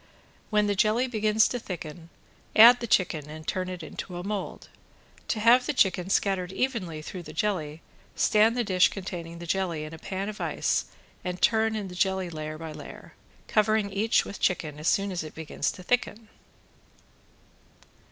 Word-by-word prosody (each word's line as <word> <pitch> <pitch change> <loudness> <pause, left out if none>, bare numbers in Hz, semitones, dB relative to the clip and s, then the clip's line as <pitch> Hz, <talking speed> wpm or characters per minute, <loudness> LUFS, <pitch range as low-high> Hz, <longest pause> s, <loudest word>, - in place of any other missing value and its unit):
When 210 -1 +3
the 205 - +1
jelly 215 +5 +2
begins 220 -3 +2
to 245 - -3
thicken 170 -4 -8 0.5
add 240 +3 +9
the 235 - -4
chicken 165 -8 +1
and 155 +1 -9
turn 185 0 -2
it 180 -2 -6
into 175 +2 -7
a 175 - -5
mold. 200 -1 -5 0.6
To 220 - -1
have 240 +3 +5
the 300 - 0
chicken 185 -4 +2
scattered 190 -2 +1
evenly 190 -9 -2
through 180 +3 -7
the 155 -2 -10
jelly, 160 -4 -2 0.3
stand 220 +3 +3
the 240 - +2
dish 185 -4 +4
containing 175 -3 -6
the 170 - -8
jelly 170 -3 -1
in 155 +1 -8
a 160 - -9
pan 195 +3 -4
of 215 0 -6
ice - - 0 0.4
and 180 0 -4
turn 220 +2 +3
in 210 -2 -3
the 180 - -9
jelly 190 -1 0
layer 155 -1 -5
by 160 0 -7
layer, - - -11 0.3
covering 215 -2 +2
each 220 +3 +2
with 200 - -8
chicken 155 -5 -1
as 155 - -3
soon 200 0 +2
as 175 -3 -3
it 155 - -10
begins 160 -1 -2
to 185 - -11
thicken. 225 0 -1
190 Hz, 180 wpm, -27 LUFS, 170-215 Hz, 0.6 s, add